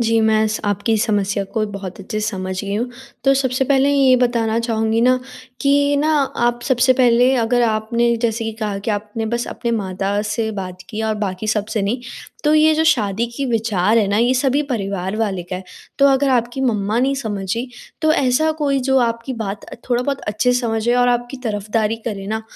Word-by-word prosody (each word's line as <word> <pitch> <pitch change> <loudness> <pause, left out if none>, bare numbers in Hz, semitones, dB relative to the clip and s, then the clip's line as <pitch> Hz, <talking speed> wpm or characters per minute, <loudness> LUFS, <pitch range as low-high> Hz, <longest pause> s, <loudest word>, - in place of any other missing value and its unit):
जी, 230 -1 +2
मैं 220 0 +3
स 215 - -3
आपकी 205 +2 0
समस्या 205 -1 0
को 220 - +1
बहुत 195 -2 -7
अच्छे 215 +2 -4
से 215 - -1
समझ 190 -3 -4
गई 200 0 -4
हूँ। 240 +4 -2 0.3
तो 270 0 +5
सबसे 260 -1 0
पहले 275 +1 +3
ये 275 -2 +4
बताना 235 -2 +1
चाहूँगी 225 -1 0
ना 255 +2 +4 0.4
कि 285 +1 +3
ना 310 +2 +2 0.3
आप 240 0 -1
सबसे 255 -1 +3
पहले 250 0 +4
अगर 240 +1 +2
आपने 235 +1 +1
जैसे 230 0 0
कि 225 - -3
कहा 205 -2 -2
कि 200 +3 -3
आपने 210 +2 -3
बस 235 +2 -2
अपने 235 - -3
माता 195 -1 -1
से 220 +1 -1
बात 185 -3 -6
किया 220 0 -3
और 215 - 0
बाकी 205 0 -3
सबसे 215 0 -1
नहीं। 225 +6 -1 0.4
तो 300 - +4
ये 310 0 +5
जो 320 +1 +1
शादी 230 -7 +2
की 280 - -2
विचार 220 -2 +2
है 210 - +2
ना, 200 - +1
ये 240 +2 +3
सभी 270 +3 +2
परिवार 200 -7 -3
वाले 200 -5 -1
का 180 +1 -5
है। 185 - -8 0.3
तो 280 - +6
अगर 275 +1 +3
आपकी 245 +1 0
मम्मा 215 -3 0
नहीं 270 +2 +2
समझी, 220 -1 -3 0.3
तो 315 0 +4
ऐसा 280 +3 +2
कोई 280 -2 +1
जो 265 0 +4
आपकी 235 +1 -1
बात 205 -3 -5
अ, - - -10 0.2
थोड़ा 245 0 +2
बहुत 275 +1 -2
अच्छे 215 +4 0
से 245 - +2
समझे 230 0 0
और 245 0 +3
आपकी 245 +2 -1
तरफदारी 215 +1 -1
करे 195 -2 -5
ना, 220 +2 -3
230 Hz, 205 wpm, -19 LUFS, 210-255 Hz, 0.4 s, तो